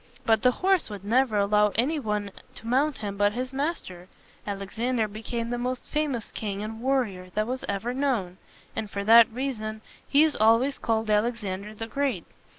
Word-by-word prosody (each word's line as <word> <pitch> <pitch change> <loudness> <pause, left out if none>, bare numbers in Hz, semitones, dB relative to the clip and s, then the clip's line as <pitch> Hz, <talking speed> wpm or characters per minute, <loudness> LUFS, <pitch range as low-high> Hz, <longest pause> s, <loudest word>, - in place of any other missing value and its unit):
But 220 -1 +3
the 250 - +5
horse 370 +5 +1
would 200 -2 -8
never 235 0 +2
allow 210 +1 +3
any 290 +7 +1
one 210 -5 -2 0.2
to - - -11
mount 270 +5 +1
him 200 -2 -5
but 205 0 +3
his 255 +3 -4
master. 265 - -3 0.4
Alexander 220 +4 -1
became 230 +3 -4
the 245 - -1
most 250 +1 -3
famous 290 -7 -2
king 205 -1 -4
and 220 +1 -6
warrior 235 -9 0
that 215 0 +1
was 255 +3 -4
ever 205 +5 -2
known; 245 -10 -1 0.4
and 220 -2 -3
for 200 -1 -4
that 230 +2 +8
reason 220 -4 -4 0.3
he 285 +2 +5
is 315 -2 +2
always 230 +6 +3
called 220 -1 0
Alexander 210 -2 -1
the 225 - -4
Great. 255 - -2
225 Hz, 175 wpm, -26 LUFS, 210-255 Hz, 0.4 s, that